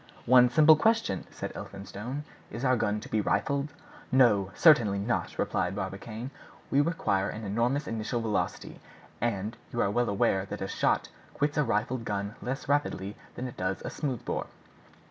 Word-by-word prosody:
"One 125 Hz, 0 st, +7 dB
simple 155 Hz, +4 st, +7 dB
question," 220 Hz, -, +1 dB
said -, -, -6 dB
Elphinstone: 105 Hz, +8 st, -6 dB, 0.3 s
"is 120 Hz, +5 st, -4 dB
our 130 Hz, 0 st, +4 dB
gun 105 Hz, -2 st, 0 dB
to -, -, -9 dB
be 110 Hz, -, 0 dB
rifled?" 140 Hz, +6 st, 0 dB, 0.4 s
"No, 110 Hz, -7 st, +4 dB
certainly 120 Hz, -12 st, +5 dB
not," 110 Hz, +5 st, -2 dB
replied 90 Hz, +1 st, 0 dB
Barbicane; 105 Hz, +6 st, -5 dB, 0.4 s
"we 140 Hz, -, +5 dB
require 125 Hz, -, 0 dB
an 110 Hz, -, -6 dB
enormous 120 Hz, +8 st, 0 dB
initial 115 Hz, +2 st, -2 dB
velocity; 110 Hz, -2 st, -2 dB, 0.4 s
and 110 Hz, -1 st, -1 dB, 0.2 s
you 120 Hz, -, -3 dB
are 100 Hz, -, +2 dB
well 120 Hz, +3 st, +1 dB
aware 95 Hz, -1 st, +1 dB
that -, -, -6 dB
a -, -, -3 dB
shot -, -, +1 dB, 0.3 s
quits 145 Hz, 0 st, 0 dB
a 150 Hz, -, +3 dB
rifled 115 Hz, +1 st, -1 dB
gun 100 Hz, -1 st, -3 dB
less 135 Hz, +3 st, -4 dB
rapidly 120 Hz, -8 st, 0 dB, 0.2 s
than 130 Hz, -, -4 dB
it 125 Hz, -, -10 dB
does 95 Hz, +1 st, -2 dB
a -, -, -3 dB
smooth 135 Hz, -6 st, -3 dB
bore." -, -, -2 dB
115 Hz, 165 wpm, -29 LUFS, 100-135 Hz, 0.4 s, One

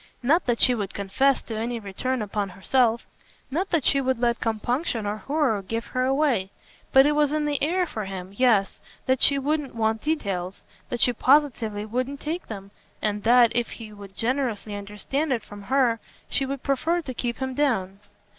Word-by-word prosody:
Not 305 Hz, +7 st, +3 dB
that 240 Hz, -1 st, +1 dB
she 250 Hz, -, +6 dB
would 205 Hz, -5 st, -4 dB
confess 260 Hz, +8 st, +1 dB
to 225 Hz, -, -6 dB
any 230 Hz, +2 st, -2 dB
return 225 Hz, +4 st, -2 dB
upon 205 Hz, -1 st, -2 dB
herself; 230 Hz, +5 st, +1 dB, 0.5 s
not 365 Hz, +7 st, -1 dB
that 330 Hz, -6 st, +1 dB
she 275 Hz, -, +3 dB
would 260 Hz, -1 st, 0 dB
let 235 Hz, 0 st, +1 dB
compunction 230 Hz, +1 st, -1 dB
or 205 Hz, +1 st, -2 dB
horror 275 Hz, -4 st, 0 dB
give 225 Hz, +4 st, -4 dB
her 255 Hz, 0 st, +1 dB
away; 265 Hz, -8 st, +1 dB, 0.4 s
but 270 Hz, +1 st, +7 dB
it 295 Hz, -, +4 dB
was 295 Hz, -1 st, +2 dB
in 305 Hz, 0 st, 0 dB
the 290 Hz, -1 st, -1 dB
air 360 Hz, +5 st, +2 dB
for 220 Hz, -, -5 dB
him 190 Hz, 0 st, -7 dB
yes 220 Hz, -5 st, +3 dB, 0.3 s
that 260 Hz, -1 st, +1 dB
she 280 Hz, -, +6 dB
wouldn't 285 Hz, -1 st, -1 dB
want 220 Hz, -1 st, 0 dB
details, 195 Hz, -, -2 dB, 0.3 s
that 240 Hz, -, -3 dB
she 245 Hz, -, +4 dB
positively 240 Hz, -6 st, +2 dB
wouldn't 255 Hz, +5 st, -3 dB
take 325 Hz, +5 st, -4 dB
them, 200 Hz, -2 st, -8 dB, 0.3 s
and 210 Hz, -1 st, -1 dB
that, 235 Hz, +1 st, +5 dB
if 240 Hz, -1 st, +1 dB
he 220 Hz, -2 st, -9 dB
would 200 Hz, -2 st, -12 dB
generously 235 Hz, -3 st, -1 dB
understand 210 Hz, +9 st, -3 dB
it 235 Hz, -4 st, 0 dB
from 205 Hz, -1 st, -11 dB
her, 245 Hz, 0 st, +2 dB, 0.3 s
she 270 Hz, -, 0 dB
would 275 Hz, -1 st, -4 dB
prefer 330 Hz, +6 st, 0 dB
to 260 Hz, -, -5 dB
keep 240 Hz, -1 st, -3 dB
him 260 Hz, -1 st, -3 dB
down. 210 Hz, -9 st, 0 dB
240 Hz, 190 wpm, -25 LUFS, 210-275 Hz, 0.5 s, but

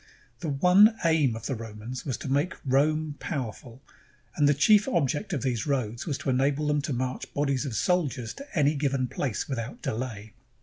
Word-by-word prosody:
The 165 Hz, -, -3 dB
one 180 Hz, +10 st, +6 dB
aim 155 Hz, -8 st, +3 dB
of 115 Hz, -, -8 dB
the -, -, -1 dB
Romans 115 Hz, +3 st, -7 dB
was 130 Hz, -, -1 dB
to -, -, -7 dB
make 145 Hz, +6 st, 0 dB
Rome 150 Hz, +3 st, +1 dB
power 130 Hz, -9 st, -3 dB
ful; 125 Hz, +1 st, -15 dB, 0.5 s
and 145 Hz, -1 st, +4 dB
the 145 Hz, -, +4 dB
chief 205 Hz, -, +5 dB
object 170 Hz, -, 0 dB
of 145 Hz, -7 st, -2 dB
these 125 Hz, 0 st, -1 dB
roads 120 Hz, -4 st, -2 dB
was 145 Hz, -4 st, -1 dB
to 135 Hz, -, -2 dB
enable 140 Hz, +3 st, +1 dB
them 150 Hz, 0 st, +1 dB
to 150 Hz, -, -4 dB
march 130 Hz, 0 st, -3 dB
bodies 140 Hz, -1 st, 0 dB
of 120 Hz, -, -4 dB
soldiers 140 Hz, -, 0 dB
to 280 Hz, -8 st, -9 dB
any 145 Hz, 0 st, +4 dB
given 135 Hz, -3 st, 0 dB
place 125 Hz, -2 st, -3 dB
without 125 Hz, -2 st, -5 dB
delay. 110 Hz, -2 st, -4 dB
140 Hz, 190 wpm, -27 LUFS, 125-155 Hz, 0.5 s, one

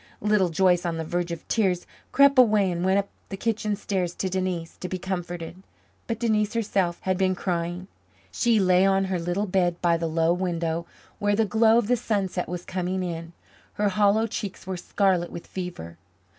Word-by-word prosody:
Little 210 Hz, -3 st, +2 dB
Joyce, 175 Hz, +1 st, +3 dB
on 170 Hz, -2 st, -2 dB
the 165 Hz, -, -2 dB
verge 175 Hz, +2 st, -2 dB
of 170 Hz, -1 st, -7 dB
tears, 185 Hz, -6 st, +1 dB, 0.3 s
crept 280 Hz, -1 st, +5 dB
away 210 Hz, -6 st, +5 dB
and 175 Hz, 0 st, -2 dB
went 190 Hz, +1 st, +3 dB
up 200 Hz, 0 st, -1 dB, 0.2 s
the 195 Hz, -, -5 dB
kitchen 215 Hz, -1 st, -1 dB
stairs 190 Hz, -3 st, -2 dB
to 190 Hz, -, -2 dB
Denise 185 Hz, -3 st, -2 dB
to 180 Hz, -, -6 dB
be 185 Hz, -, -2 dB
comforted. 175 Hz, -1 st, -5 dB, 0.5 s
But 230 Hz, -, -2 dB
Denise 215 Hz, -2 st, 0 dB
herself 195 Hz, -6 st, 0 dB
had 185 Hz, 0 st, -1 dB
been 185 Hz, -1 st, +2 dB
crying. 175 Hz, 0 st, -3 dB, 0.4 s
She 235 Hz, -3 st, +2 dB
lay 185 Hz, -1 st, +4 dB
on 195 Hz, 0 st, +3 dB
her 180 Hz, -, 0 dB
little 175 Hz, +4 st, -1 dB
bed 180 Hz, -3 st, +1 dB
by 170 Hz, -1 st, +2 dB
the 165 Hz, 0 st, -2 dB
low 165 Hz, +1 st, +2 dB
window, 170 Hz, -2 st, -2 dB, 0.3 s
where 205 Hz, -1 st, +2 dB
the 220 Hz, +1 st, +2 dB
glow 220 Hz, +3 st, +4 dB
of 235 Hz, -, +2 dB
the 245 Hz, +1 st, +3 dB
sunset 195 Hz, -5 st, -2 dB
was 175 Hz, 0 st, -5 dB
coming 185 Hz, 0 st, -2 dB
in; 165 Hz, -1 st, -5 dB, 0.4 s
her 205 Hz, 0 st, +1 dB
hollow 205 Hz, +3 st, +3 dB
cheeks 205 Hz, -4 st, -5 dB
were 190 Hz, 0 st, -3 dB
scarlet 180 Hz, -1 st, 0 dB
with 170 Hz, -, -8 dB
fever. 170 Hz, -, -7 dB
185 Hz, 190 wpm, -25 LUFS, 175-205 Hz, 0.5 s, crept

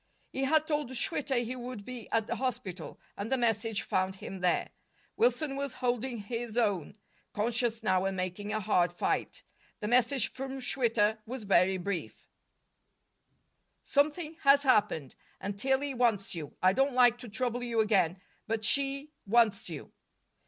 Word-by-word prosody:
He 270 Hz, -, -1 dB
had 310 Hz, +2 st, +3 dB
told 295 Hz, -4 st, -1 dB
Schwitter 265 Hz, -2 st, 0 dB
he 250 Hz, +3 st, -4 dB
would 245 Hz, -4 st, -7 dB
be 250 Hz, -3 st, -7 dB
at 225 Hz, -1 st, +1 dB
the -, -, -3 dB
hospital, 190 Hz, -, -4 dB, 0.2 s
and 205 Hz, +4 st, -5 dB
the 265 Hz, -, +3 dB
message 225 Hz, -2 st, 0 dB
found 185 Hz, 0 st, 0 dB
him 190 Hz, 0 st, -8 dB
there. 180 Hz, -1 st, +1 dB, 0.4 s
Wilson 315 Hz, -, +1 dB
was 280 Hz, -2 st, -3 dB
holding 245 Hz, 0 st, -1 dB
his 230 Hz, +1 st, -4 dB
own, 205 Hz, -5 st, 0 dB, 0.4 s
conscious 230 Hz, +1 st, 0 dB
now 185 Hz, -2 st, +2 dB
and 195 Hz, -1 st, -1 dB
making 185 Hz, +3 st, -3 dB
a 215 Hz, -, 0 dB
hard 180 Hz, -4 st, +2 dB
fight. 175 Hz, -, -2 dB, 0.4 s
The 210 Hz, -, -3 dB
message 245 Hz, +1 st, +3 dB
from 270 Hz, 0 st, -5 dB
Schwitter 230 Hz, -4 st, +1 dB
was 250 Hz, 0 st, -5 dB
very 190 Hz, -1 st, +3 dB
brief: 185 Hz, -1 st, -5 dB, 1.6 s
"Something 305 Hz, +3 st, 0 dB
has 280 Hz, 0 st, +6 dB
happened, 205 Hz, -, +2 dB, 0.3 s
and 200 Hz, +1 st, -4 dB
Tillie 265 Hz, +5 st, 0 dB
wants 230 Hz, -6 st, +1 dB
you. 150 Hz, -4 st, -7 dB
I 185 Hz, 0 st, +6 dB
don't 270 Hz, +4 st, +2 dB
like 245 Hz, -1 st, +5 dB
to 245 Hz, -2 st, -9 dB
trouble 245 Hz, +3 st, -1 dB
you 235 Hz, -2 st, -1 dB
again, 195 Hz, -5 st, +2 dB, 0.3 s
but 225 Hz, -1 st, -1 dB
she 275 Hz, +5 st, +2 dB, 0.2 s
wants 215 Hz, -3 st, +3 dB
you." 155 Hz, -4 st, -8 dB
230 Hz, 155 wpm, -30 LUFS, 200-265 Hz, 1.6 s, has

